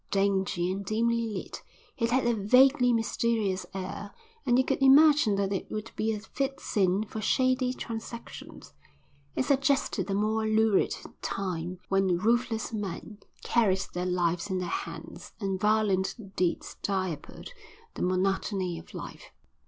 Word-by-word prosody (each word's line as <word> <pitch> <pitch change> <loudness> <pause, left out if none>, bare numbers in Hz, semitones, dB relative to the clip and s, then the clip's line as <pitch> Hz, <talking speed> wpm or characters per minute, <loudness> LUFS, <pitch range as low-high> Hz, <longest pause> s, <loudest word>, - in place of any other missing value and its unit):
Dingy 195 -2 +1
and 195 +1 -3
dimly 230 +2 0
lit, 210 -4 -6 0.3
it 230 -3 0
had 255 +1 +2
a 240 - +3
vaguely 250 +5 +5
mysterious 225 -4 0
air 195 +2 -6 0.3
and 245 0 +4
you 260 - +3
could 275 - -1
imagine 280 -4 +6
that 200 0 0
it 195 - -4
would 215 +1 -5
be 220 +1 0
a 215 - -3
fit 270 +5 -3
scene 195 0 +1
for 220 0 -6
shady 255 +2 +2
transactions. 235 -1 -8 0.6
It - - 0
suggested 270 - +1
a 195 - 0
more 220 +2 +1
lurid 220 -2 +3 0.3
time, 180 -2 -3
when 195 -2 +2
ruthless 230 +3 0
men 205 0 -5 0.2
carried 195 -5 +2
their 180 +1 -2
lives 175 +1 0
in 190 - -1
their 180 -1 -3
hands, - - -6
and 195 -3 -2
violent 210 -2 +2 0.2
deeds 180 -2 -1
diapered 185 - -3 0.4
the - - -7
monotony 185 -1 0
of 165 - -14
life. - - -8
210 Hz, 145 wpm, -28 LUFS, 190-235 Hz, 0.6 s, imagine